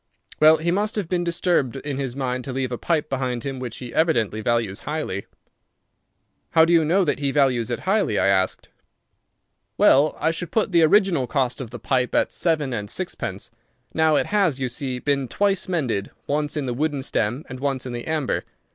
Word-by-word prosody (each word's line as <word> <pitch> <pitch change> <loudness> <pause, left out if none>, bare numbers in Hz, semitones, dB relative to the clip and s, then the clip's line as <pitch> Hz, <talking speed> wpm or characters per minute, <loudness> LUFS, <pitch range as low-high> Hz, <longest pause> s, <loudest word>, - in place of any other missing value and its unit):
Well, 155 +1 +7
he 165 +2 -1
must 205 +4 0
have 205 -5 -2
been 175 0 0
disturbed 170 -6 0
in 135 0 -4
his 135 -3 -3
mind 130 -2 -2
to 135 - -4
leave 130 -1 -2
a 120 - -2
pipe 160 -3 0
behind 130 -3 -2
him 135 -2 -4
which 125 -2 -5
he 125 -2 -8
evidently 115 - +1
values 115 -4 0
highly." 150 -10 -4 1.3
"How 160 - +8
do 170 - +2
you 165 -1 +5
know 180 +6 +3
that 145 - 0
he 140 -1 0
values 130 -5 +2
it 120 - -3
highly?" 190 - +1
I - - +2
asked. 95 -1 +1 1.1
"Well, 145 +3 +4
I 160 - +2
should 170 +1 -5
put 220 -3 0
the 170 -2 +4
original 165 -5 +3
cost 130 -3 -1
of 125 - -6
the 120 - -7
pipe 125 +2 0
at - - +2
seven 155 -6 0
and 105 -3 -4
sixpence. - - -4 0.4
Now 160 -1 +3
it - - +2
has, 195 -10 +1
you 130 -1 -1
see, 125 +1 -3
been 140 0 0
twice 200 +6 0
mended, 130 - -1 0.2
once 150 +1 -1
in 145 - -1
the 125 - -2
wooden 145 +1 -1
stem 120 +4 -1
and 130 0 -8
once 135 -2 -2
in 125 - -5
the 120 0 -6
amber. 155 -4 -1
140 Hz, 200 wpm, -23 LUFS, 125-160 Hz, 1.3 s, How